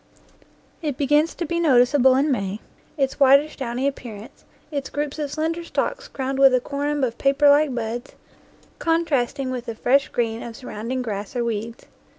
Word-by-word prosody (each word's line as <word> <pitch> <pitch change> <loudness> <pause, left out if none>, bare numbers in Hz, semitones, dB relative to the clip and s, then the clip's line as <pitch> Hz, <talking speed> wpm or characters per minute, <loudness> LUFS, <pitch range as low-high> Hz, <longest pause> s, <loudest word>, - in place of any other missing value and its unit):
It 295 -5 -3
begins 295 +3 +2
to 345 - -3
be 340 +2 -2
noticeable 260 -3 +4
in 280 +3 +2
May, 200 -4 -2 0.4
its 270 -1 -1
whitish 280 +2 +5
downy 255 0 -3
appearance, 235 -3 -7 0.3
its 280 -3 -3
groups 295 +1 -3
of 295 -2 -2
slender 325 +3 -2
stalks - - -2
crowned 270 0 -3
with 270 -2 +7
a - - +3
corymb 285 +2 -2
of 235 -2 -5
paperlike 285 0 +4
buds, 235 +2 -4 0.6
contrasting 285 -5 0
with 250 -1 -5
the 230 - -4
fresh 270 +5 +2
green 230 -1 -2
of 230 -1 -8
surround 230 -1 -7
ing 260 -1 -1
grass 205 -2 -5
or 240 -1 0
weeds. 230 0 -4
270 Hz, 165 wpm, -23 LUFS, 240-290 Hz, 0.6 s, with